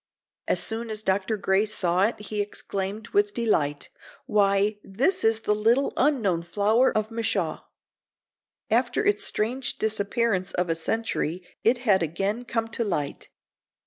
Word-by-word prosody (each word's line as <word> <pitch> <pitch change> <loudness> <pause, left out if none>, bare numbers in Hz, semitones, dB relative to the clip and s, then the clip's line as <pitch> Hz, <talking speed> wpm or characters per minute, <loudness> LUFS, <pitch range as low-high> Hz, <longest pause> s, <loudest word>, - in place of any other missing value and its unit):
As 180 - +2
soon 225 +5 -4
as 215 0 -4
Dr. 195 +3 0
Gray 190 0 +2
saw 185 -2 +2
it 225 - -2
he 210 0 -3
exclaimed, 205 +1 -4
with 410 0 +1
delight: 150 -11 0 0.4
"Why, 205 0 +2
this 275 - 0
is 225 0 +2
the 210 - +1
little 230 +6 +2
unknown 225 - +2
flower 210 +8 +2
of 215 +1 -1
Michaux." 220 -7 -1 1.1
After 240 - +2
its 410 0 +2
strange 250 - -1
disappearance 210 -2 0
of 180 -1 0
a - - +1
century 180 -2 -2 0.2
it 235 +3 +4
had 195 -5 +4
again 195 +9 -2
come 225 -1 -1
to 230 +1 -2
light. 150 -9 -3
210 Hz, 145 wpm, -26 LUFS, 190-230 Hz, 1.1 s, it